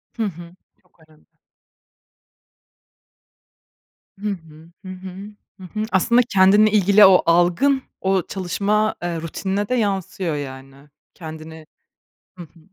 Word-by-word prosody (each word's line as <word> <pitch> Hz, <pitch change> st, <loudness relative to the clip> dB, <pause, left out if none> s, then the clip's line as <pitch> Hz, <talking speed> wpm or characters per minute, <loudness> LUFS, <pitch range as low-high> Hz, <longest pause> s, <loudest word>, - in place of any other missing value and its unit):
Hı 230 Hz, -, -2 dB
hı. 175 Hz, -2 st, -8 dB, 0.3 s
Çok 180 Hz, -2 st, -36 dB
önemli. 155 Hz, -1 st, -25 dB, 2.9 s
Hı 210 Hz, +1 st, -3 dB
hı. 165 Hz, -3 st, -9 dB
Hı -, -, -8 dB
hı. 185 Hz, 0 st, -9 dB, 0.5 s
Hı -, -, -12 dB
hı. 215 Hz, +4 st, -5 dB
Aslında 235 Hz, +6 st, +3 dB
kendinle 205 Hz, +2 st, +5 dB
ilgili 205 Hz, 0 st, +5 dB
o 190 Hz, -1 st, +6 dB
algın, 175 Hz, +12 st, +2 dB, 0.2 s
o 190 Hz, -2 st, +1 dB
çalışma, 200 Hz, +3 st, -1 dB
eee, 170 Hz, -2 st, -3 dB
rutinine 195 Hz, +5 st, -3 dB
de 255 Hz, -, +1 dB
yansıyor 190 Hz, -6 st, -2 dB
yani. 135 Hz, 0 st, -9 dB, 0.2 s
Kendini 160 Hz, -1 st, -10 dB, 0.7 s
Hı 175 Hz, -, -8 dB
hı. 165 Hz, +1 st, -19 dB
185 Hz, 120 wpm, -21 LUFS, 165-205 Hz, 2.9 s, o